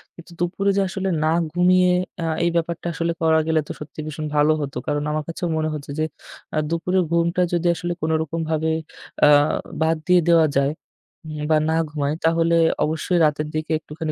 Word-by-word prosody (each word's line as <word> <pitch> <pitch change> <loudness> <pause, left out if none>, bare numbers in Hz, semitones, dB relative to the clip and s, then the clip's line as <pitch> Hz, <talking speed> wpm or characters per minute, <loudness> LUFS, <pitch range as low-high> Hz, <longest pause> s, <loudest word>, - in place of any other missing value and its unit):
কিন্তু 170 +1 -14
দুপুরে 185 +3 0
যে 200 - +4
আসলে 190 0 -2
না 155 - +2 0.2
ঘুমিয়ে 180 +1 +4 0.3
আ - - -1 0.2
এই 170 - +3
ব্যাপারটা 170 0 -2
আসলে 165 +1 -1
করা 160 -1 +4
গেলে 160 -1 +2
তো - - -5
সত্যি 150 +1 -10
ভীষণ 155 0 -5
ভালো 150 +1 +4
হতো। 140 -3 -4
কারণ 145 0 0
আমার 155 0 -1
কাছেও 170 +1 -3
মনে 155 0 0
হতো 145 -1 -8
যে 155 - +2 0.5
অ্যা 155 - 0
দুপুরের 180 +2 +1
ঘুমটা 170 +1 +1
যদি 175 0 +1
আসলে 175 0 -3
কোনরকমভাবে 160 0 -1 0.5
আ - - +7 0.5
বাদ 160 +1 +3
দিয়ে 180 -1 +5
দেওয়া 165 -2 +5
যায় 140 +1 +2 0.6
হুম 155 -1 -6
বা 155 - +5
না 160 - +1
ঘুমাই 145 -1 -2
তাহলে 165 +1 +3 0.3
অবশ্যই 160 +3 -1
রাতের 150 0 0
দিকে 155 0 -3
একটুখানি 155 0 -5
160 Hz, 185 wpm, -22 LUFS, 155-170 Hz, 0.6 s, আ